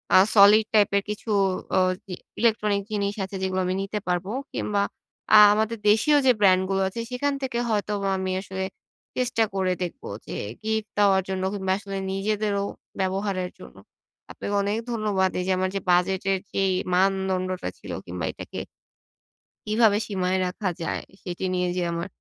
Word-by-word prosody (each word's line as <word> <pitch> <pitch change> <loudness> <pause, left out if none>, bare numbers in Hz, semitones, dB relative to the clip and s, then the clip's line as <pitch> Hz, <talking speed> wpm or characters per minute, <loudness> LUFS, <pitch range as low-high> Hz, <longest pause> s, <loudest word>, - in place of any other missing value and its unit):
আ - - +10 0.2
solid 210 +2 +8
টাইপের 200 -1 +4
কিছু 210 +2 -5 0.5
অ - - +6 0.3
জি 190 - -7 0.3
electronic 210 -3 +2
জিনিস 200 -1 -1
আছে 195 +1 -6
এগুলো 185 0 0
আমি 185 +1 0
নিতে 205 +2 -3
পারব। 180 0 0 0.3
কিংবা 205 -1 0 0.5
আ - - +11 0.2
আমাদের 220 +2 0
দেশীয় 290 +8 +4
যে 255 - +7
ব্র্যান্ডগুলো 190 0 +4
আছে, 195 +5 -5
সেখান 285 +3 0
থেকে 255 -3 -2
হয়তোবা 205 -2 0
আমি 190 0 -2
আসলে 190 -1 -5 0.5
চেষ্টা 240 -3 +1
করে 190 -1 +1
দেখবো, 175 - -6 0.2
যে - - -7 0.3
গিফট 220 0 -1
দেওয়ার 195 -2 +4
জন্য 190 -1 -2
কিংবা 190 -2 -2
আসলে 195 -1 -6
নিজেদেরও 200 0 0 0.4
ব্যবহারের 190 -1 -1
জন্য। - - -13 0.5
আপনাকে 205 - -4
অনেক 205 +2 0
ধন্যবাদ, 210 -4 +1
এইযে 180 +1 -1
আমার 185 0 0
যে - - +1
বাজেটের 190 +2 +2
যেই 195 -1 +2 0.2
মানদণ্ডটা 185 - +1
ছিল - - -9
কিংবা 90 -1 -4
এটাকে - - -8 1.1
কিভাবে 215 -1 +4
সীমায় 190 -2 0
রাখা 185 +1 -2
যায়, 165 - -2 0.2
সেটি 180 0 -5
নিয়ে 180 0 0
যে 180 - +1
আমার 170 +2 -3
195 Hz, 155 wpm, -25 LUFS, 185-210 Hz, 1.1 s, আ